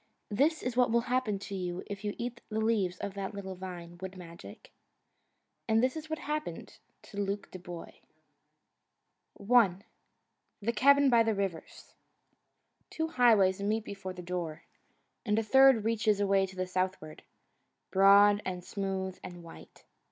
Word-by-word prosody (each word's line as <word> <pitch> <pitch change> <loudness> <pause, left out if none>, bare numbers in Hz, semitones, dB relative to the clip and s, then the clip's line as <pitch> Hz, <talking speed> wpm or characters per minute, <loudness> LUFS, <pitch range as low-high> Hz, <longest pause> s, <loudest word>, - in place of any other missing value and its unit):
This 295 +9 +1
is 250 -1 -2
what 250 0 +3
will 235 +1 +3
happen 245 -4 -1
to 200 0 -8
you 180 -2 -4
if 200 0 -7
you 205 -1 -3
eat 235 0 -5
the 220 0 -2
leaves 210 -5 +1
of 200 - -5
that 200 0 -5
little 190 -1 -6
vine, 175 -2 -9
Wood 190 0 -7
Magic. 165 - -12 1.0
And 225 +1 +3
this 255 +3 +1
is 315 0 -7
what 315 - -2
happened 300 +1 -5 0.2
to 205 - -5
Luke 200 0 -3
Dubois. 175 -2 -9 1.5
I 210 -3 +4 0.8
The 230 +3 -1
Cabin 280 +4 +5
by 235 -1 +6
the 225 -1 +1
Rivers 195 -5 -5 1.0
Two 320 0 -3
highways 210 - +4
meet 215 +2 0
before 195 -2 -6
the 180 -1 -9
door, 170 -3 -4 0.6
and 210 -2 0
a 225 - +2
third 265 -1 +5
reaches 220 -2 +1
away 195 -1 +2
to 190 - -13
the 185 0 -2
southward, 185 -4 -3 0.7
broad 200 +2 +6
and 180 -1 -5
smooth 190 -1 -4
and 175 -1 -9
white. 165 - -14
200 Hz, 150 wpm, -30 LUFS, 185-230 Hz, 1.5 s, by